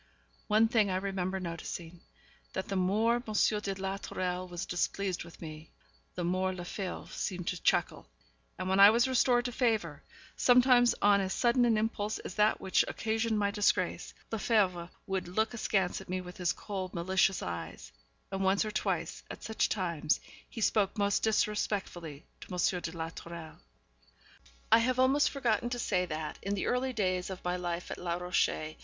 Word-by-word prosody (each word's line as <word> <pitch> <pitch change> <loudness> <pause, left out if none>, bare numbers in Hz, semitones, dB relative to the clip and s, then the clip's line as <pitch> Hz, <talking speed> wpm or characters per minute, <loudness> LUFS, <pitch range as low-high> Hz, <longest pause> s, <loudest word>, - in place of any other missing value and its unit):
One 215 +1 +4
thing 220 -3 +2
I 185 - 0
remember 190 -1 -2
noticing, 170 -1 -6 0.5
that 190 - -4
the 195 - -2
more 210 +6 +2
M. - - -5 0.4
de 200 -2 -3
la 195 0 -3
Tourelle 185 -2 -3
was 175 0 -4
displeased 185 +1 -1
with 170 0 -14
me, 155 -1 -9 0.5
the 180 - -3
more 185 +2 0
Lefebvre 185 +1 -6
seemed 180 -2 -3
to 180 - -4
chuckle; - - +1 0.5
and - - -4
when 190 +1 +2
I 200 +1 +11
was 235 +4 +3
restored 250 -1 +3
to 245 - -1
favour, 220 - 0 0.3
sometimes 245 -1 +5
on 200 -1 +5
as 190 0 -2
sudden 245 0 +3
an 230 -2 +3
impulse 215 -1 -1
as - - -7
that 210 +2 +3
which 190 - +2
occasioned 220 0 -1
my 200 -1 +1
disgrace, 205 0 0 0.2
Lefebvre 195 -6 +1 0.2
would 190 -2 -2
look 220 +6 0
askance 195 -5 0
at 190 - -14
me 185 0 -1
with 180 -1 -9
his 180 -1 +1
cold, 190 -3 -5
malicious 190 +2 +2
eyes, 85 -1 -6 0.4
and 195 0 -2
once 190 +2 +3
or 215 - -3
twice - - -2
at - - -9
such 220 - 0
times 170 -6 0 0.3
he 225 - -7
spoke 205 -1 +2
most 200 -1 +2
disrespectfully 200 -8 -1
to - - -12 0.2
M. 180 - -3
de 160 - -4
la 160 0 -3
Tourelle. 170 -1 -9 1.1
I - - +8
have 250 +2 +1
almost 265 +3 +4
forgotten 240 -4 0
to 245 - -3
say 185 -6 0
that, 155 -1 -5
in 200 +1 -2
the 195 - -2
early 255 +1 0
days 185 -6 -1
of 190 -1 -7
my 180 0 0
life 175 -1 -4
at - - -5
Les 175 -1 -2
Rochers, 180 0 +2
M. 155 0 -6
195 Hz, 180 wpm, -31 LUFS, 180-220 Hz, 1.1 s, I